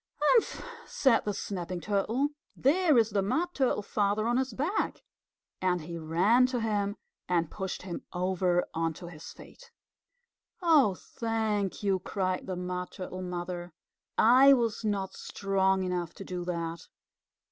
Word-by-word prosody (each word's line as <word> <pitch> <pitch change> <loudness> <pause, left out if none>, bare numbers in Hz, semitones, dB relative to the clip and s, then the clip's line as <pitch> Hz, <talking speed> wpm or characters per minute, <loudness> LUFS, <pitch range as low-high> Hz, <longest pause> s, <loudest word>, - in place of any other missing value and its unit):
"Humph!" 365 +11 +3 0.2
said 265 -4 +3
the 205 - -1
Snapping 180 -2 -4
Turtle. 215 +9 0 0.3
"There 310 +1 +3
is 225 -1 +4
the 200 -1 +1
Mud 315 - 0
Turtle 255 -6 +1
Father 205 +1 0
on 240 +1 +2
his 260 0 0
back." 295 - -2 0.6
And 180 -2 +1
he 170 +2 -6
ran 185 +11 +3
to 255 -1 -2
him 205 -2 0 0.3
and 170 -3 +1
pushed 190 -2 -4
him 180 -2 -5
over 180 0 +1
onto 165 +1 -2
his 165 -2 -9
feet. - - -15 0.9
"Oh, 300 - +4
thank 220 -3 -2
you," 195 -2 +2
cried 185 0 -2
the 185 - -2
Mud 180 0 -4
Turtle 185 -1 -6
Mother. 175 -1 -5 0.4
"I 260 +5 +7
was 230 -4 0
not 200 -3 -1
strong 190 -1 0
enough 180 -2 -3
to - - -8
do 180 -1 -4
that." 170 -1 -4
195 Hz, 145 wpm, -29 LUFS, 180-230 Hz, 0.9 s, I